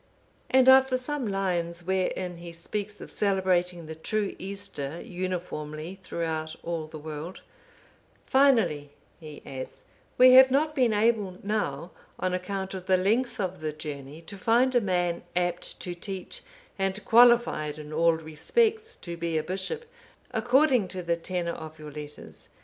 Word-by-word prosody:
And 260 0 +5
after 265 0 +7
some 260 -1 -3
lines, 175 -3 -1
wherein 185 -1 -1
he 170 0 -9
speaks 205 +5 -4
of - - -8
celebrating 180 -3 +1
the 160 - -6
true 205 +6 -2
Easter 190 -6 -5
uniformly 175 -2 -5
throughout 160 -3 -3
all 165 -2 -3
the 155 0 -9
world,— 155 +3 -7 0.8
"Finally," 220 - +3 0.3
he 155 -3 -10
adds, 130 -1 -7 0.3
"we 255 0 +8
have 260 +1 +9
not 300 +4 +2
been 255 -5 +3
able 210 -3 +1
now, 180 -6 -2 0.3
on 185 0 0
account 190 +1 -3
of 185 -1 -7
the 185 -1 +4
length 225 +7 +1
of 185 -2 -2
the 155 -1 -2
journey, 150 0 -8
to 195 +4 -9
find 240 +6 +3
a 245 - +4
man, 175 -3 0
apt 175 -1 -1
to 180 - -4
teach, 190 - -6 0.4
and 195 +1 -1
qualified 235 -11 +5
in 150 0 -8
all 165 +1 +4
respects 435 - 0
to 170 - -7
be 170 -1 -2
a 155 - 0
bishop, 195 - -3 0.5
according 250 -1 +3
to 185 0 -6
the 170 0 +1
tenor 170 0 -3
of 160 0 -9
your 150 -1 -9
letters. 150 0 -10
185 Hz, 150 wpm, -27 LUFS, 165-220 Hz, 0.8 s, have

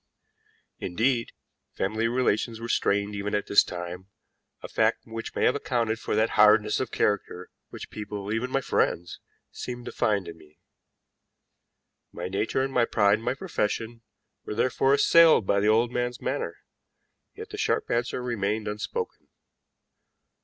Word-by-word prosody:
Indeed, 115 +6 0 0.4
family 110 +4 -1
relations 115 -2 0
were 115 - -5
strained 100 -2 +1
even 100 0 -2
at 105 - -1
this 100 - +5
time, 90 +1 -7 0.6
a - - -5
fact - - +1
which 115 0 -7
may - - +1
have - - +4
accounted 115 -5 -1
for - - -2
that 110 +1 +2
hardness 105 0 +5
of 130 - -2
character 95 -3 -1 0.2
which - - -9
people, 105 -1 -5
even 115 +3 -1
my 135 +1 0
friends, 85 -8 -1 0.3
seemed 120 -1 -7
to - - -5
find 105 -5 0
in 80 -1 -9
me. 75 -1 -20 1.5
My 85 +1 -5
nature 105 +7 0
and 135 0 -3
my 120 -2 +3
pride 105 -2 +3
in - - -12
my 125 - -1
profession 115 - -3 0.4
were 105 - -5
therefore 135 +4 +2
assailed 165 - +6
by 100 - +2
the 105 - +1
old 115 +2 +3
man's 125 0 -2
manner, - - -3 0.8
yet - - -9
the - - -6
sharp - - 0
answer 120 +1 -1
remained 110 -3 -2
unspoken. 105 - -4
110 Hz, 155 wpm, -26 LUFS, 100-120 Hz, 1.5 s, assailed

